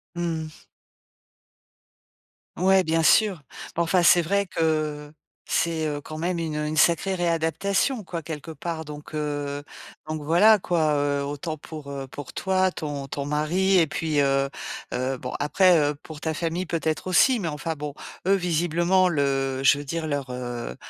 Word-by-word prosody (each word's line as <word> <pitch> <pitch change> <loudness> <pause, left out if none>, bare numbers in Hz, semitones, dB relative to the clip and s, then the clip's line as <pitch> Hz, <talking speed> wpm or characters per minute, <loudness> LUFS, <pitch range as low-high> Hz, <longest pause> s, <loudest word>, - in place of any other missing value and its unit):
Mmh 165 -2 -2
mh. 155 - -16 1.9
Ouais, 190 +1 +4
bien 165 +1 +1
sûr. 195 -1 +4 0.3
Bon 170 - +1
enfin, 175 +1 +2
c'est 175 +1 +6
vrai 200 +4 +1
que 155 -3 -1 0.4
c'est, 160 -2 0
heu, 145 -1 -2
quand 155 0 -8
même 175 +1 -1
une, 160 -2 -3
heu, 150 0 -1
une 155 +1 -3
sacrée 170 +4 +3
réadaptation, 175 - 0
quoi, 170 -2 -5
quelque 160 0 -7
part, 160 0 -5
donc, 150 +1 -10
heu, 145 -1 -3 0.4
donc 155 0 -4
voilà 205 +8 +5
quoi, 160 -5 +1
heu. 145 -1 0
Autant 145 +3 -4
pour, 150 -1 -9
heu, 135 -1 -5
pour 145 0 -9
toi, 190 0 +1
ton 145 -5 -5
ton 140 +1 -4
mari 175 +6 +2
et 165 - +4
puis, 155 -1 -1
heu 135 0 +2 0.4
heu, 130 +1 -1
bon 125 - -6
après, 175 +4 +4
heu, 145 0 +1
pour 155 -2 -10
ta 160 -1 -2
famille 170 +3 -2
peut-être 160 0 -2
aussi, 225 +6 +4
mais 170 - -2
enfin 155 +2 -3
bon, 145 -1 -6 0.3
eux, 195 - +6
visiblement 175 +1 +2
le 135 -3 0
je 140 +1 +6
veux 145 - -6
dire 165 +2 -3
leur, 140 -3 -2
heu 120 - -5
160 Hz, 170 wpm, -25 LUFS, 145-175 Hz, 1.9 s, c'est